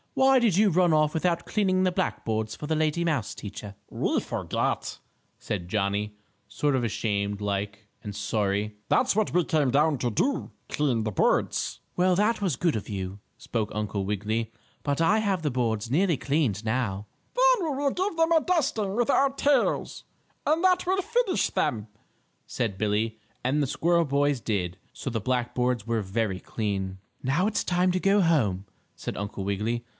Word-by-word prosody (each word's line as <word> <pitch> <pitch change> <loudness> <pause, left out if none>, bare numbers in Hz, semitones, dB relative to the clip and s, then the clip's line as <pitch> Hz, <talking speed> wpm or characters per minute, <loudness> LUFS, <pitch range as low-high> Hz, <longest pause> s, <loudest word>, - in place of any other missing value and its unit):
"Why 265 0 +5
did 220 -7 +2
you 205 -1 +5
run 175 -1 +3
off 155 -1 +3
without 170 +1 0
cleaning 185 -3 +1
the 185 - +2
black 185 +1 -2
boards 110 -1 -1
for 150 - -7
the 160 - +1
lady 155 +2 +1
mouse 155 -6 0
teacher?" 100 0 -8
"We - - 0
forgot," - - -2 0.4
said 90 -5 -4
Johnnie, 105 +1 -1 0.3
sort 140 +6 0
of 130 - 0
ashamed 100 -2 -1
like 100 +1 -3 0.2
and 105 -1 -6
sorry. 105 0 -1
"That's 250 - +3
what 215 -1 +1
we 175 -1 +2
came 150 -5 +2
back 145 0 +3
to 120 - 0
do 270 - -1 0.2
clean 130 -7 0
the 110 - -2
boards." - - +1 0.2
"Well, 180 0 +3
that 210 +4 +2
was 185 -8 +1
good 170 -3 +1
of 105 - -4
you," 95 -1 -4 0.2
spoke 110 -3 -3
Uncle 105 -2 -2
Wiggily. 105 +3 -2 0.3
"But 145 +2 0
I 205 +7 +4
have 195 -6 0
the 150 - 0
boards 115 -3 -1
nearly 170 +1 +3
cleaned 125 -7 0
now." 110 -4 -1 0.3
"Then - - +4
we 275 - -2
will 280 0 +1
give 370 +1 -2
them 325 0 +3
a 325 -1 +5
dusting 250 - 0
with 240 +2 +1
our 275 0 +4
tails, 280 +1 +1 0.4
and 315 +4 +2
that 370 0 +3
will 380 +2 +1
finish 460 0 +1
them," 110 -2 -1 0.6
said 115 -6 -2
Billie, 110 +2 0 0.2
and 135 +4 +1
the 140 - +1
squirrel 170 +4 +2
boys 140 -2 +1
did, 90 -6 -2 0.2
so - - -5
the 115 -3 -2
black 125 +1 -1
boards 125 -3 0
were 115 -1 0
very 100 -1 -1
clean. 95 -3 -3 0.3
"Now 145 +10 +2
it's 215 - 0
time 180 +1 +2
to 185 - +1
go 195 +2 +3
home," 110 - +2 0.3
said - - -5
Uncle 100 -1 -4
Wiggily. 110 +4 -1
130 Hz, 180 wpm, -27 LUFS, -, 0.6 s, Why